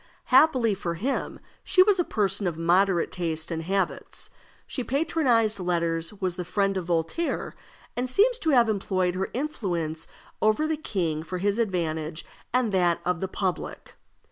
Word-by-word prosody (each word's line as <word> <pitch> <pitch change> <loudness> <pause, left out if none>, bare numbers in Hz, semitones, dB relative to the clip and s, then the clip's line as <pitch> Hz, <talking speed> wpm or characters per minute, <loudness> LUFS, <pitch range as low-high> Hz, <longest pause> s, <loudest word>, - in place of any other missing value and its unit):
Happily 255 -6 +5
for 175 -3 -3
him, 255 +11 -2 0.2
she 370 - +5
was 390 -1 +3
a - - +4
person 200 - 0
of 165 -2 -2
moderate 175 +1 +2
taste 165 -3 -3
and 165 -1 -2
habits. 190 +2 -2 0.3
She 255 - -4
patronized 250 -7 +1
letters, 170 -2 0
was 185 -3 -2
the 180 - -2
friend 195 +2 0
of 185 -2 -2
Voltaire, 170 - -1 0.4
and 250 +1 -1
seems 465 - +3
to 320 - 0
have 245 -5 +5
employed 190 -4 0
her 190 +1 -2
influence 175 - -2 0.3
over 215 +9 +3
the 315 - 0
king 175 - -2
for 175 +3 -5
his 200 +4 0
advantage 165 -6 -2 0.3
and 250 -3 +1
that 175 -3 +2
of 180 -1 0
the 190 - -2
public. 185 -1 -4
190 Hz, 160 wpm, -26 LUFS, 170-240 Hz, 0.4 s, Happily